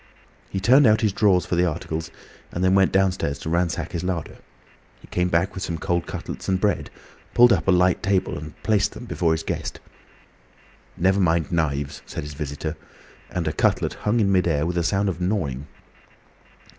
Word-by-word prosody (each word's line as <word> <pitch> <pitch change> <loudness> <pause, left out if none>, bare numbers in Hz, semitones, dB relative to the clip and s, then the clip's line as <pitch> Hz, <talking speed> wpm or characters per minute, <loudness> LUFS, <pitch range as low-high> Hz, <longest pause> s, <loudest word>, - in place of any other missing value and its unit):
He 95 - -3
turned 130 +7 +6
out 110 0 +4
his 105 -4 +1
drawers 95 -4 +3
for - - -1
the 90 +1 +3
articles, 80 0 -4 0.4
and 90 - -3
then 95 0 +4
went 95 -1 +4
downstairs 95 -7 +1
to 80 - -5
ransack 85 -1 0
his 85 -1 -3
larder. 90 -4 -3 0.6
He - - -16
came 90 0 -1
back 85 +3 +1
with 95 - -6
some 85 - -3
cold 85 0 -1
cutlets - - -6
and 95 -1 +2
bread, 100 -1 0 0.5
pulled 120 0 +7
up - - -1
a - - +5
light 90 0 +3
table, 95 -1 0
and 75 0 -8
placed 105 -1 +2
them - - -9
before 85 -8 0
his 80 - -2
guest. - - -4 1.2
"Never 95 +3 +2
mind 85 -3 +1
knives," 75 -4 -1
said - - -5
his 75 0 -7
visitor, 75 +1 -4 0.5
and 85 -3 -3
a 80 - 0
cutlet - - +1
hung 110 +3 0
in 100 -3 +2
mid 90 -2 +3
air, 75 -2 +1
with 85 +1 -1
a - - 0
sound 100 +4 +1
of 90 -2 -3
gnawing. 75 -8 -2
90 Hz, 195 wpm, -23 LUFS, 80-95 Hz, 1.2 s, pulled